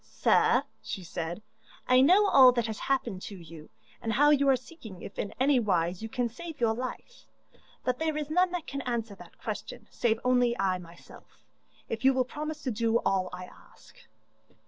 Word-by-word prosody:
'Sir,' - - +2 0.2
she 190 - -6
said, 170 +3 -5 0.4
'I 255 0 +6
know 370 +9 +6
all 260 -6 +8
that 235 -2 0
has 220 -2 -5
happened 240 -8 -1
to 200 - -7
you, 165 -2 -12 0.3
and 225 - -2
how 290 +5 +5
you 280 -1 +4
are 270 - +6
seeking 245 - -11
if 195 - -9
in 205 - -3
any 265 0 +4
wise 180 -4 0
you 225 - -5
can 245 0 -1
save 320 +6 -9
your 230 -2 +2
life. 255 - -7 0.6
But 250 -1 -1
there 315 -1 -1
is 300 0 -4
none 360 +3 +3
that 345 -3 -3
can 275 -3 -5
answer 235 -4 -3
that 180 -3 -15
question - - -6
save 225 -2 0
only 245 -1 +2
I 190 -1 0
myself, 170 -1 -16 0.4
if 225 +1 -5
you 265 0 +5
will 255 -1 +2
promise 305 +3 -6
to 255 - -1
do 230 +1 +1
all 190 -1 +1
I 180 0 -7
ask. - - -19
240 Hz, 190 wpm, -29 LUFS, 195-275 Hz, 0.6 s, all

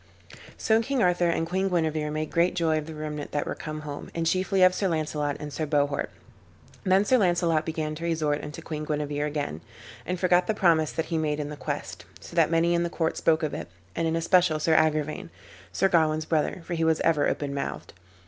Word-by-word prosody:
So 220 0 +3
King 260 0 0
Arthur 180 -1 +3
and 165 -1 0
Queen 190 +3 0
Guenever 160 -4 0
made 155 0 -3
great 175 +2 +2
joy 160 -3 +2
of 150 - -8
the 160 - -7
remnant 150 -1 -5
that 145 - 0
were - - -3
come 155 0 -6
home, 145 -1 -7
and 165 -1 -1
chiefly 185 +2 +2
of 185 0 +6
Sir 195 - 0
Launcelot 150 -3 -1
and 150 -1 -7
Sir 155 - -2
Bohort. 145 -1 0 0.7
Then 190 +1 +3
Sir 255 +3 +4
Launcelot 170 -4 +2
began 155 -1 -2
to 160 +2 -7
resort 155 -3 0
unto 150 +2 -7
Queen 155 -2 -5
Guenever 150 -1 -2
again, 145 - -3 0.4
and 180 0 -3
forgot 180 -1 +3
the 220 - 0
promise 165 -6 +3
that 160 - -2
he 160 - +1
made 150 -1 -1
in 145 -1 -3
the 150 - -6
quest: - - -5
so - - -12
that - - +4
many 165 +1 +2
in 170 - +2
the 170 - -1
court 165 -1 -1
spoke 160 -1 +2
of 155 - -1
it, 75 - -5 0.3
and 165 0 0
in 160 - 0
especial 165 -1 +3
Sir 160 +1 +2
Agrivain, 155 - +1 0.4
Sir 195 - +2
Gawain's 155 -3 +2
brother, 160 +2 -1
for 175 - -4
he 165 -1 0
was 160 -1 +2
ever 155 -3 +3
open 145 -1 -3
mouthed. 140 - -5
160 Hz, 220 wpm, -26 LUFS, 150-175 Hz, 0.7 s, of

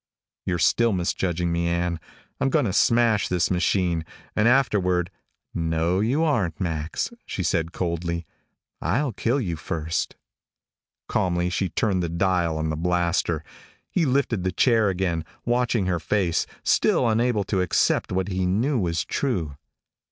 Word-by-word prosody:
"You're 90 - +1
still 110 +8 +3
misjudging 90 -1 -1
me, 85 0 0
Ann. 85 0 -1 0.4
I'm 135 - +2
going 130 - +2
to 95 - -1
smash 115 -2 +3
this 90 0 0
machine 90 -1 +1 0.3
and 110 +1 +3
afterward 95 -9 +2 0.3
" - - -59
"No 80 +2 0
you 130 +10 +1
aren't, 100 - 0
Max," 80 - -2 0.2
she 95 - -3
said 85 -1 0
coldly. 85 -1 -2 0.6
"I'll 135 +5 0
kill 120 +7 0
you 90 -10 -2
first." 80 0 -3 0.9
Calmly 90 -1 0
she 95 +1 0
turned 95 +1 0
the 85 - -2
dial 85 -2 +1
on 80 0 -1
the - - -2
blaster. 85 -1 0 0.5
He 165 -5 +1
lifted 125 -7 +1
the 95 - 0
chair 110 +2 +3
again, 90 -3 -1 0.2
watching 120 -3 +1
her 90 -2 0
face, 90 -1 0 0.2
still 125 - +3
unable 115 -1 +2
to 95 -1 0
accept 90 - +1
what 95 0 0
he 95 -1 0
knew 120 +9 +1
was 85 -4 -1
true. 90 - -2
90 Hz, 150 wpm, -24 LUFS, 85-110 Hz, 0.9 s, still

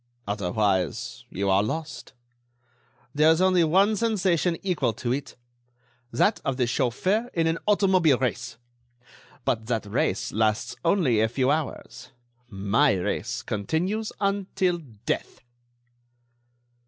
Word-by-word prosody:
Otherwise, 100 -3 -1
you 100 +2 -3
are 95 0 +4
lost. 150 +6 -5 1.0
There 150 +2 +4
is 160 +1 +4
only 185 -2 +4
one 195 +7 +3
sensation 185 -6 +1
equal 155 - 0
to 120 +3 -3
it: 140 0 -5 0.8
that 205 - +2
of 135 -2 -2
the 125 - +2
chauffeur 185 - 0
in 165 -1 +2
an 165 0 0
automobile 190 -8 +4
race. 120 -2 -3 0.9
But 110 0 -1
that 115 -3 -1
race 100 - -1
lasts 110 0 0
only 165 - +2
a 110 - +2
few 130 +3 +1
hours; 130 -5 -4 0.4
my 100 0 +2
race 90 -2 -2
continues 180 - -2
until 195 -3 0 0.3
death!" - - -3
140 Hz, 115 wpm, -25 LUFS, 110-185 Hz, 1.0 s, are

